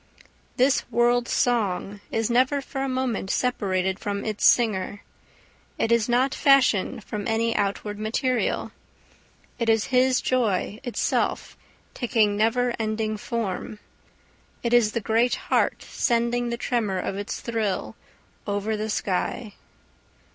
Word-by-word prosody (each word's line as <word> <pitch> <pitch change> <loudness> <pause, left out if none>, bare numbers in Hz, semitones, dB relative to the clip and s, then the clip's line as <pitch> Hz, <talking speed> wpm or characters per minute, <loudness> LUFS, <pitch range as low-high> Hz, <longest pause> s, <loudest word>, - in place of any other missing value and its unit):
This 260 +2 +2
world 240 0 +2
song 205 -4 0
is 225 -1 0
never 260 +4 +3
for 270 0 -5
a 270 - -1
moment 255 -6 -2
separated 190 -6 0
from 200 -1 -3
its 215 -2 -3
singer. 205 -3 +2 0.7
It 225 - 0
is 235 0 +2
not 255 +3 +2
fashioned 260 -5 +3
from 205 -1 -5
any 230 0 +1
outward 205 +1 -2
material. 240 +3 -1 0.9
It 235 -1 0
is 220 -1 +3
his 255 0 +4
joy 220 -4 0
itself 245 -3 -1 0.4
taking 220 -4 +1
never 235 +3 +1
ending 215 0 -1
form. 215 -1 -4 0.9
It 235 0 0
is 225 -3 +4
the 230 - -1
great 230 +4 +2
heart - - 0
sending 240 0 0
the 235 - -2
tremor 230 -6 -1
of 185 - -3
its 205 +1 -4
thrill 225 -4 -2 0.5
over 205 +2 -1
the 215 +1 -3
sky. 205 +2 -2
225 Hz, 125 wpm, -25 LUFS, 205-245 Hz, 0.9 s, his